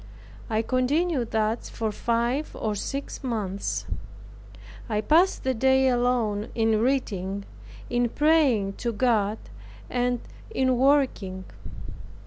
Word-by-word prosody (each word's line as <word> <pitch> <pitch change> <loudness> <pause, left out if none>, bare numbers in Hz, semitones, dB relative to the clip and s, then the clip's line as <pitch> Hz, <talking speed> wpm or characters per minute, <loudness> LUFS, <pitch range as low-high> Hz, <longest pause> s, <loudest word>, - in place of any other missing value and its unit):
I 220 0 +1
continued 255 +1 +1
thus 220 +1 -1
for 220 -2 -2
five 235 +7 -1
or 215 -1 -2
six 275 +9 -5
months. 205 -6 -2 1.0
I 210 -2 0
passed 325 - +3
the 260 - +1
day 265 +2 +3
alone 240 -4 +1
in 225 -2 +2
reading, 200 -7 -1 0.4
in 240 0 +1
praying 275 -10 +3
to 235 -1 -1
God, 215 -2 +2 0.5
and 245 0 +1 0.3
in 260 - +1
working. 250 -8 +2
240 Hz, 110 wpm, -26 LUFS, 215-265 Hz, 1.0 s, passed